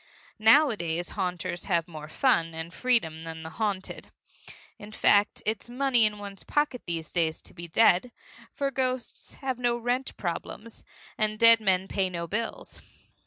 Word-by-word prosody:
Nowadays 215 - +3
haunters 180 -3 -3
have 170 -4 0
more 155 -3 -9
fun 165 - +2
and 165 +1 -7
freedom 165 -12 0
than 160 0 -7
the 160 - -8
haunted. 200 0 -3 0.7
In 205 +1 -10
fact, 205 -1 +3
it's 220 +2 -2
money 250 -2 +3
in 210 0 -5
one's 200 -1 -9
pocket 295 -4 0
these 165 -2 -3
days 160 -2 0
to - - -11
be 170 -1 -8
dead, 220 +5 +3 0.4
for 275 -1 -2
ghosts 255 -1 -3
have 260 -3 -4
no 240 -1 +1
rent 245 +3 -2
problems, 205 +5 -6 0.4
and 215 0 0
dead 230 0 +7
men 190 -3 +1
pay 195 -2 0
no 170 -2 -4
bills. 210 +7 -4
205 Hz, 155 wpm, -27 LUFS, 170-240 Hz, 0.7 s, dead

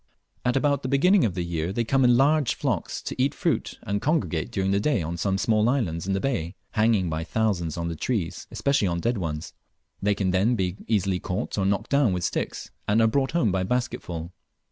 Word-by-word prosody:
At 125 +1 +1
about 140 0 +2
the 130 - -3
beginning 180 +6 +4
of 95 -6 -1
the 90 - -1
year 85 0 -2
they 115 +4 0
come 135 +3 +2
in 120 -1 +5
large 145 0 +3
flocks - - -2
to - - -3
eat 140 +2 +1
fruit, 170 -6 -1
and 100 -2 -2
congregate 140 - 0
during 95 0 0
the 100 - +2
day 115 - +1
on 85 +2 -3
some 95 +3 0
small 110 +1 +2
islands 90 - -1
in 95 - +1
the 95 - +1
bay, 95 -8 -2 0.2
hanging 110 -4 +2
by 80 0 -2
thousands 90 -5 -1
on 85 0 -2
the 85 - -3
trees, 95 -2 -2
especially 140 -7 +1
on 85 -1 -1
dead 115 +4 0
ones. 80 -3 -4 0.5
They 105 0 +2
can 95 -2 0
then 100 +7 +2
be 95 -2 -1
easily 95 -4 +1
caught 90 0 -3
or 95 -2 +1
knocked 100 0 -1
down 140 -8 +3
with 90 -1 -2
sticks, - - -3 0.2
and 105 +2 +3
are 115 - +5
brought 135 +5 +1
home 125 - +2
by 95 0 0
basketsfull. 90 -7 -3
100 Hz, 220 wpm, -25 LUFS, 90-125 Hz, 0.5 s, in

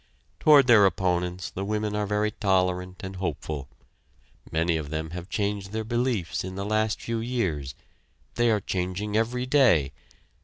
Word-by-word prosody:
Toward 145 -3 +7
their 110 -5 +7
opponents 90 -1 -1
the 95 - -4
women 105 +1 -2
are 105 -1 -1
very 105 +1 0
tolerant 90 -2 0
and 95 -1 -7
hopeful. 75 -6 -4 0.8
Many 85 +1 +1
of 75 -3 -3
them 80 +1 -4
have 90 +1 -7
changed 100 -2 -2
their 110 0 -2
beliefs 115 -6 -1
in 95 0 -6
the 100 +1 -4
last 110 +1 0
few 115 -1 -3
years. 90 - -2 0.6
They 120 0 +2
are 105 -2 +2
changing 95 +3 -3
every 120 +3 0
day. 120 - +4
100 Hz, 155 wpm, -26 LUFS, 90-110 Hz, 0.8 s, Toward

